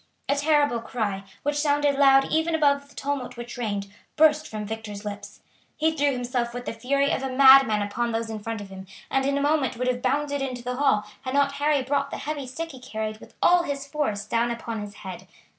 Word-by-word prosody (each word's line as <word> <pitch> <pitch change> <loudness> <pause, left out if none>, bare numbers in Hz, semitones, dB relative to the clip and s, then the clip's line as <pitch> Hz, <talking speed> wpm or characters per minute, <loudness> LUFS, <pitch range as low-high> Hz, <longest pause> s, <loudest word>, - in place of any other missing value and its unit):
A 280 - +2
terrible 290 -4 +2
cry, 205 -5 -3 0.2
which 290 0 0
sounded 290 -1 +2
loud 270 -1 +5
even 320 +1 +1
above 280 -2 +2
the - - -20
tumult 280 -3 -3
which 240 0 -7
reigned, 205 -4 -3 0.2
burst 305 0 +4
from 215 -1 -5
Victor's 215 -1 -6
lips. 205 0 -7 0.4
He 320 +1 +2
threw 290 -1 +2
himself 245 -1 -2
with 245 0 -5
the - - -3
fury 275 +5 +1
of - - 0
a 270 - -2
madman 265 -5 +7
upon 235 +4 -2
those 225 0 -2
in 220 -1 -5
front 225 0 -5
of 200 - -9
him, 190 0 -9 0.2
and 270 0 +1
in 280 0 +1
a - - 0
moment 285 -4 +1
would 250 +1 -1
have 250 -1 0
bounded 285 +2 0
into 255 -3 -4
the 250 +1 -3
hall 265 -7 +2 0.2
had 260 0 -4
not 280 0 +3
Harry 285 0 +1
brought 280 +2 0
the - - -5
heavy 290 -3 -4
stick 325 +6 -5
he 265 - -11
carried 220 -4 -5
with - - -15
all 355 0 +6
his 280 -4 -4
force 275 -9 -2
down 230 +2 +1
upon 230 -2 -4
his 205 0 -8
head. 185 -4 -9
260 Hz, 225 wpm, -25 LUFS, 225-285 Hz, 0.4 s, madman